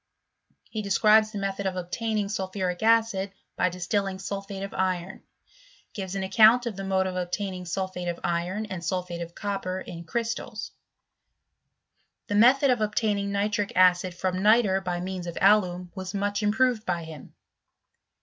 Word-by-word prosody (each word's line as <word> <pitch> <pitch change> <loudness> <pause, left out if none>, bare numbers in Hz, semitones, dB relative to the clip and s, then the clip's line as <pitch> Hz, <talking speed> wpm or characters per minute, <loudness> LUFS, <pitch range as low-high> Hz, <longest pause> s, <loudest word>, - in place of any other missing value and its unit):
He 215 - -4
describes 215 +2 +4
the 210 - -6
method 195 0 -2
of 185 - -2
obtaining 210 +4 -2
sulphuric 190 -3 -3
acid 220 -3 +2 0.2
by 180 - +2
distilling 190 +2 -2
sulphate 195 0 -5
of 195 - -6
iron; 185 0 -2 0.7
gives 195 -2 -5
an 195 - -2
account 220 +5 +6
of 230 -4 -3
the 195 - -6
mode 190 -1 +1
of 185 -1 -3
obtaining 180 +1 -3
sulphate 185 0 -3
of 170 -1 -3
iron 175 +5 -1
and 190 -5 -6
sulphate 180 -1 -3
of 170 0 -7
copper, 195 -3 -3
in 170 -2 -8
crystals: 230 +6 -4 1.5
the - - -4
method 255 +6 +5
of 245 -3 +1
obtaining 210 -2 0
ni 200 +1 +1
tric 205 -1 -2
acid 180 -1 +4
from 185 +1 -2
nitre 210 -2 +4
by 175 -1 -2
means 185 -1 -5
of 170 - -6
alum, 180 -3 +3
was 190 0 -6
much 205 +1 -1
im 210 0 +2
proved 245 -1 +2
by 175 -4 -2
him. 160 -3 -11
195 Hz, 160 wpm, -26 LUFS, 180-210 Hz, 1.5 s, account